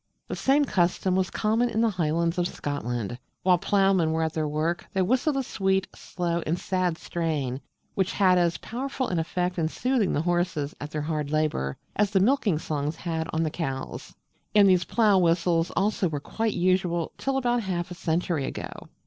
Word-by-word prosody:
The - - -2
same 285 +2 +3
custom 180 -3 +1
was 190 0 +1
common 225 +3 +1
in 220 - -1
the 230 - +4
Highlands 170 0 0
of 175 - +2
Scotland. 120 - -4 0.2
While 180 -2 +4
ploughmen 195 -4 +3
were 160 0 +1
at 160 -1 -1
their 155 -1 -1
work 155 +3 -1
they 190 - +2
whistled 260 - +1
a 270 - 0
sweet, 190 -4 0
slow, 170 -1 -2
and 165 +3 +1
sad 180 -3 -1
strain, 150 -8 -2 0.3
which 190 -1 0
had 185 -2 +4
as 170 -1 +2
powerful 260 +2 -3
an 175 - 0
effect 180 +2 -1
in 160 - +1
soothing 245 +3 0
the 150 - 0
horses 175 -4 0
at 150 - -5
their 150 -1 -3
hard 150 -2 -2
labour 150 - 0 0.2
as 210 -1 +2
the 195 -1 +2
milking 210 - +3
songs 150 0 -2
had 165 -1 -3
on 160 +1 0
the 155 - -1
cows: 135 -6 -5 0.4
and 205 -1 +7
these 185 -2 +4
Plough 210 -5 +3
whistles 170 -1 +2
also 200 0 +1
were 150 -2 -3
quite 220 +8 -2
usual 175 -2 +1
till 270 0 0
about 245 -2 +1
half 180 -3 -3
a - - -3
century 165 -3 -1
ago. - - -5
175 Hz, 190 wpm, -26 LUFS, 160-195 Hz, 0.4 s, and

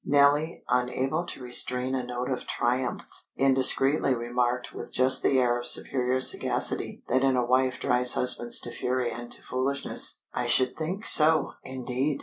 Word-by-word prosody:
Nellie, 145 +3 +1
unable 130 +6 -1
to 130 - -7
restrain 125 +1 -1
a 130 -1 -2
note 125 +1 -5
of 130 - -5
triumph, 125 +1 -2 0.3
indiscreetly 135 +1 +3
remarked 120 +1 -3
with - - -9
just 130 +1 +2
the 135 - +1
air 120 -1 +1
of 120 - -5
superior 130 0 +1
sagacity 130 - 0
that 130 +2 +1
in 135 -1 +2
a 125 -1 0
wife 130 +1 0
drives 125 0 +2
husbands 120 -1 +2
to 120 - -5
fury 125 -1 -2
and 120 +1 -9
to - - -10
foolishness: 135 +2 -3 0.2
"I - - -3
should 130 -1 +3
think 180 +7 -5
so, 155 0 +6
indeed!" 130 +2 -4
130 Hz, 160 wpm, -26 LUFS, 125-135 Hz, 0.3 s, so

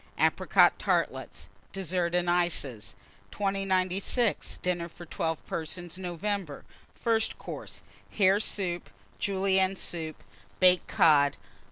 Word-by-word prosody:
Apricot - - +4
Tartlets. - - -1 0.3
DESSERT 180 -2 -1
AND 175 0 +1
ICES. 160 - 0 0.3
2096. 195 +3 0
DINNER 175 -1 -1
FOR 175 +1 -12
12 160 0 -3
PERSONS 170 +2 -4
(November). 180 -3 -3 0.3
FIRST 225 -1 0
COURSE. - - -8 0.3
Hare 195 -1 +3
Soup. 180 -5 -2 0.3
Julienne 190 -1 +1
Soup. 160 -4 -5 0.4
Baked 180 -1 +5
Cod. 145 -3 +4
180 Hz, 95 wpm, -29 LUFS, 170-195 Hz, 0.4 s, Baked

